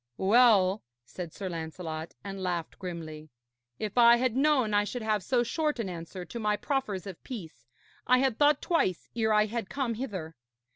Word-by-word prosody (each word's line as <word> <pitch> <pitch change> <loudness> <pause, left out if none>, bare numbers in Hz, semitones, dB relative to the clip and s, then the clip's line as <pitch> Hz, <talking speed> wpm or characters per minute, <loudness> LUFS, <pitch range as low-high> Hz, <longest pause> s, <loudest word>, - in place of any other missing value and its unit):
'Well,' 205 -2 +5 0.2
said 175 +5 -7
Sir 195 - -6
Lancelot, 160 -1 -5
and 195 -1 -6
laughed 175 -3 -3
grimly, 160 -4 -7 0.5
'if 215 +2 -2
I 235 0 +8
had 245 -1 0
known 270 -6 +3
I 205 0 +4
should 235 +3 -5
have 215 -2 +1
so 240 +6 +1
short 300 +3 -1
an 225 -5 -3
answer 175 +1 -7
to 235 - -7
my 210 -1 +1
proffers 260 - -2
of 190 -4 -9
peace, 195 - -9 0.4
I 255 - +6
had 260 -3 +1
thought 295 -1 +4
twice 330 - 0
ere 220 -2 +1
I 210 0 +4
had 225 -1 -4
come 265 -4 -1
hither. 190 -10 -5
210 Hz, 180 wpm, -29 LUFS, 180-245 Hz, 0.5 s, I